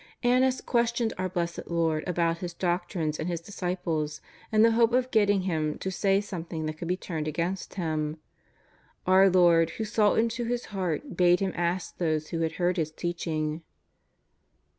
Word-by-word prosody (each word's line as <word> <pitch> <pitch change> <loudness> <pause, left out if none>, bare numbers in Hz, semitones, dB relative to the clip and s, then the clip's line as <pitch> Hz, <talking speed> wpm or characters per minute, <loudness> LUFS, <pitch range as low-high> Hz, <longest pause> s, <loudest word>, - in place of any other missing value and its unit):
Annas 255 +1 +3
questioned 235 -1 +1
our 185 0 -1
Blessed 170 -1 -3
Lord 165 -2 0
about 170 -1 0
His 175 -1 -5
doc 175 0 -1
trines 155 -5 -2
and 160 - -2
His 170 -1 -2
disciples, 170 -5 -3 0.3
in 215 0 +5
the 230 - +6
hope 230 +1 +3
of 255 0 +1
getting 205 -3 +3
Him 155 -5 -1
to 190 - -4
say 195 +1 +2
something 170 -5 -5
that 155 0 -5
could 170 - -5
be 180 +1 0
turned 160 -5 -4
against 170 +5 -3
Him. 155 -4 -2 0.9
Our 190 +1 +6
Lord 170 -3 +5
who 220 - -2
saw 210 -1 +2
into 230 +1 0
his 240 +1 -2
heart 190 - -2
bade 180 0 +4
him 195 -1 0
ask 175 +1 -2
those 155 -3 0
who 165 - -3
had 165 -1 0
heard 180 +1 0
His 160 -2 0
teaching. 155 -2 -3
175 Hz, 175 wpm, -27 LUFS, 165-205 Hz, 0.9 s, the